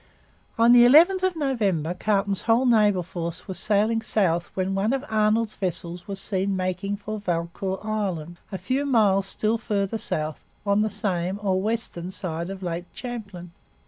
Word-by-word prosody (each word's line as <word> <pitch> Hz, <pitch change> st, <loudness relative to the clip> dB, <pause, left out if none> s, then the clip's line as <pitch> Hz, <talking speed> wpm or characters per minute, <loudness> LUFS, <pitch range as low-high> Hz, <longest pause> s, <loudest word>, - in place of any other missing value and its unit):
On 230 Hz, +1 st, +5 dB
the 240 Hz, 0 st, +8 dB
11th 335 Hz, +10 st, +6 dB
of 375 Hz, -2 st, 0 dB
October 200 Hz, -, 0 dB
Carleton's 200 Hz, +1 st, 0 dB
whole 235 Hz, +3 st, +4 dB
naval 210 Hz, -6 st, +4 dB
force 170 Hz, -1 st, -6 dB
was 190 Hz, -, -4 dB
sailing 215 Hz, +2 st, +2 dB
south 175 Hz, -6 st, +1 dB
when 190 Hz, 0 st, -1 dB
one 200 Hz, +5 st, +1 dB
of 270 Hz, +1 st, -2 dB
Arnold's 215 Hz, 0 st, +2 dB
vessels 175 Hz, -1 st, -4 dB
was 195 Hz, -1 st, -5 dB
seen 195 Hz, 0 st, -1 dB
making 185 Hz, +2 st, -2 dB
for 215 Hz, +1 st, -5 dB
Valcour 180 Hz, +1 st, -2 dB
Island, 180 Hz, -6 st, -3 dB
a 190 Hz, -, -3 dB
few 265 Hz, +7 st, -1 dB
miles 200 Hz, -6 st, +3 dB
still 220 Hz, +3 st, 0 dB
farther 210 Hz, 0 st, -1 dB
south 155 Hz, -5 st, -2 dB, 0.3 s
on 200 Hz, +1 st, +3 dB
the 215 Hz, -, +1 dB
same, 190 Hz, -2 st, -2 dB
or 190 Hz, -2 st, +1 dB
western, 210 Hz, -5 st, -2 dB
side 170 Hz, -2 st, -4 dB
of 195 Hz, -1 st, -7 dB
Lake 175 Hz, 0 st, -3 dB
Champlain. 205 Hz, -8 st, -7 dB
200 Hz, 165 wpm, -25 LUFS, 180-220 Hz, 0.3 s, the